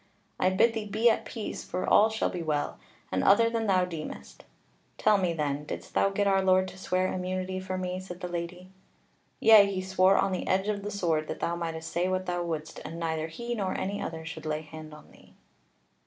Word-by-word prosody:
I 185 - +4
bid 210 +5 +3
thee 220 -2 -4
be 225 +3 +4
at - - -2
peace, 225 -3 -5
for 180 - -3
all 215 +2 +6
shall 220 0 -1
be 180 - -4
well, 150 -3 -2 0.3
and 95 - 0
other 230 +3 +5
than 225 -1 -1
thou 185 -2 +3
deemest. 155 - -8 0.5
Tell 210 -2 +4
me, 180 -2 +1
then, 150 -3 -2
didst 150 - -7
thou 195 - +3
get 200 +1 0
our 195 -1 +3
Lord 185 0 +3
to - - -13
swear 185 0 0
immunity 185 0 -3
for 185 0 -4
me?" 185 0 -3
Said 180 -1 -8
the 180 - -4
Lady: 175 +1 -6 0.7
"Yea, 215 -3 +8
he 190 - -2
swore 190 +1 +3
on 195 - +2
the 185 - -3
edge 190 +2 +1
of 205 -1 -1
the 205 - -4
sword 165 -6 0
that - - -5
thou 170 - -1
mightest 165 -1 -4
say 175 +2 0
what 185 0 -1
thou 175 -1 -1
wouldst, 160 -2 -4
and 165 +1 -7
neither 160 -1 -1
he 235 +9 -5
nor 200 -5 -2
any 200 +2 -3
other 160 -1 -5
should 160 -1 -7
lay 155 0 -1
hand 155 0 -10
on 150 - -14
thee." - - -20
185 Hz, 220 wpm, -28 LUFS, 165-195 Hz, 0.7 s, Yea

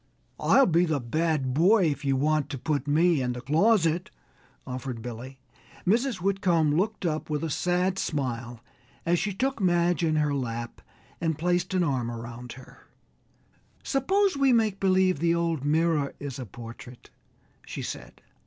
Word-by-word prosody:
"I'll 275 - +5
be 170 0 +3
the 155 -4 0
bad 140 +1 -1
boy 185 - +4
if 145 - -6
you 135 -1 +1
want 150 +1 +1
to 140 - -4
put 145 +1 -2
me 160 +1 +3
in 125 -1 -1
the 125 - -6
closet," 165 - +2 0.6
offered 125 -2 -5
Billy. 125 +2 -7 0.5
Mrs. 235 +6 +2
Whitcomb 180 -5 +1
looked 200 +3 -1
up 155 -2 -2
with 150 0 -2
a 160 - -2
sad 180 +3 0
smile, 120 -5 -3 0.4
as 170 0 +2
she 205 +3 -1
took 260 +5 -2
Madge 175 -1 +2
in 155 -1 +2
her 150 -1 +1
lap 120 -3 -4 0.4
and 160 -3 0
placed 175 +2 0
an 180 - +3
arm 130 -7 -1
around 120 +1 -7
him. 130 +1 -14 1.1
"Suppose 380 +7 +1
we 275 -1 +3
make 220 -4 +2
believe 185 -4 +3
the 170 +1 +2
old 165 -4 -1
mirror 155 -1 +1
is 140 -2 -6
a 125 - -6
portrait," 120 +3 -11 0.6
she - - -5
said. - - -8
160 Hz, 160 wpm, -27 LUFS, 130-185 Hz, 1.1 s, I'll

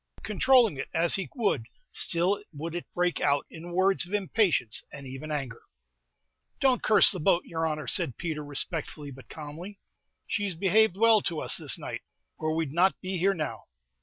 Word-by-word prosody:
Controlling 225 - +3
it 135 - -5
as 165 +1 +2
he 195 - -1
would, 200 - -1 0.2
still 180 +5 +1
would 160 +2 -6
it 175 - -7
break 180 0 0
out 145 -1 +1
in 170 +2 -9
words 190 +2 +3
of 180 +4 -4
impatience 185 - 0
and 140 -1 -10
even 135 +4 -8
anger. 135 -6 -4 1.0
"Don't 260 -2 +2
curse 210 -3 +6
the 185 - -4
boat, 175 +2 +2
yer 165 -1 -2
honor," 155 -1 -4
said 125 - -1
Peter, 160 -3 -4
respectfully, 145 0 -2
but 135 0 -14
calmly; 160 +6 -9 0.5
"she's 205 -4 -2
behaved 195 +2 +3
well 225 -1 +5
to 165 -4 -2
us - - +5
this - - +4
night, - - -6 0.4
or 155 0 -1
we 165 0 0
'd 135 - -8
not 180 +3 +2
be 185 -1 -4
here 195 +3 +2
now." 155 -3 -5
170 Hz, 180 wpm, -27 LUFS, 150-195 Hz, 1.0 s, curse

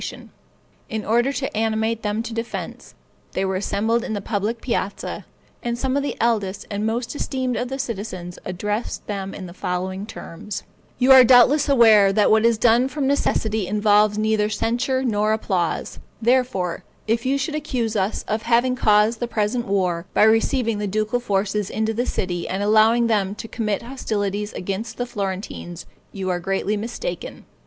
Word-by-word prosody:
In 220 -1 -3
order 240 +5 +2
to 275 -3 -4
animate 220 +1 0
them 210 +1 -1
to 230 - -6
defense, 230 +1 -6 0.4
they 190 - 0
were 190 0 -1
assembled 220 +4 0
in - - -4
the 205 - -2
public 210 +3 -2
piazza, 215 -5 -3 0.3
and 235 0 -2
some 260 +1 -1
of 285 - +2
the 280 - -3
eldest 210 -4 0
and 205 +1 -1
most 235 +4 -2
esteemed 260 -3 -2
of 245 - -2
the 265 +2 -4
citizens 200 -8 -5
addressed 210 +5 -3
them 195 -2 -4
in 190 - -7
the 175 - -10
following 185 +2 -3
terms: 195 0 -7 0.3
"You 255 +1 +4
are 260 -1 +10
doubtless 260 +5 +5
aware 220 -7 +6
that 210 0 +3
what 220 +1 +4
is 230 -1 +2
done 240 +3 +4
from 275 +1 -3
necessity 220 -7 0
involves 210 0 +3
neither 215 -1 +1
censure 245 +4 0
nor 215 -3 +1
applause; 185 -6 -2 0.2
therefore, 230 -7 +1 0.2
if 230 +2 0
you 270 +2 +1
should 280 +3 -2
accuse 255 -7 -2
us 200 +1 -1
of 215 +1 -1
having 240 +2 +2
caused 215 0 +3
the 240 - -2
present 230 +2 -1
war, 180 -3 0
by - - +5
receiving 225 0 +2
the 205 - -2
ducal 215 +4 0
forces 205 -2 -1
into 220 0 -1
the 240 +3 -1
city, 175 -2 -2
and 190 +2 -2
allowing 220 +3 +4
them 205 -3 +1
to 225 - -7
commit 215 -3 -2
hostilities 210 -5 -3
against 200 +4 -4
the 245 - -1
Florentines, 190 -5 -5 0.3
you 195 -2 -5
are 175 - -1
greatly 195 +3 -1
mistaken. 235 - -5
220 Hz, 170 wpm, -22 LUFS, 200-240 Hz, 0.4 s, are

